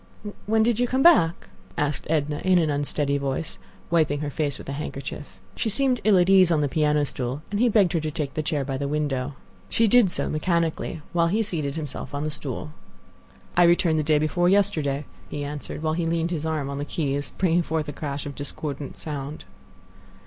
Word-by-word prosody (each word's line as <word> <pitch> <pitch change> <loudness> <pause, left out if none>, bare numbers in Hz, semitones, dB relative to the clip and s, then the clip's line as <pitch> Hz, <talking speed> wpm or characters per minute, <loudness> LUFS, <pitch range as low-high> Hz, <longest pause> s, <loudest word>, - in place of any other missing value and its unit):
"When 220 +1 +3
did 235 0 +1
you 245 - +2
come 260 +2 +1
back?" 170 - +5 0.3
asked 150 -2 -1
Edna 150 -2 0
in 185 -1 +3
an 160 -3 +2
unsteady 145 0 0
voice, 140 +4 -3 0.3
wiping 155 -3 +2
her 145 -1 -3
face 145 -2 -1
with - - -10
her 140 - -3
handkerchief. 140 -5 -6 0.2
She 225 - -1
seemed 255 +2 +1
ill 210 -3 +5
at 175 0 +4
ease 190 -2 +6
on 160 -3 +2
the 145 - +2
piano 150 0 +2
stool, 130 +2 -4
and 205 - -1
he 245 +1 +4
begged 200 -5 +3
her 165 - +2
to 155 0 -2
take 145 -2 -4
the 155 - -1
chair 150 -2 -1
by 135 -1 -2
the 140 +1 -2
window. 145 -2 -2 0.3
She 230 - +3
did 235 -2 +5
so, - - -1
mechanically, 165 -1 -1
while 170 -1 +3
he 215 +6 +1
seated 155 -8 -2
himself 150 -2 -5
on 145 - -2
the 155 - -2
stool. 150 +1 -5 0.8
"I 175 - +5
returned 170 -2 +4
day 155 0 +3
before 155 +4 +2
yesterday," 155 -8 +1 0.2
he 145 - -4
answered, 145 +2 -6
while 155 0 +1
he 165 0 -1
leaned 165 +1 0
his 160 -2 -2
arm 155 -3 -1
on 140 0 -4
the - - -2
keys, 145 -3 -2
bringing 175 -2 +3
forth 160 -2 -2
a 145 - -5
crash 140 -1 -4
of 145 - -5
discordant 145 0 -5
sound. 145 -1 -6
155 Hz, 205 wpm, -25 LUFS, 145-175 Hz, 0.8 s, ease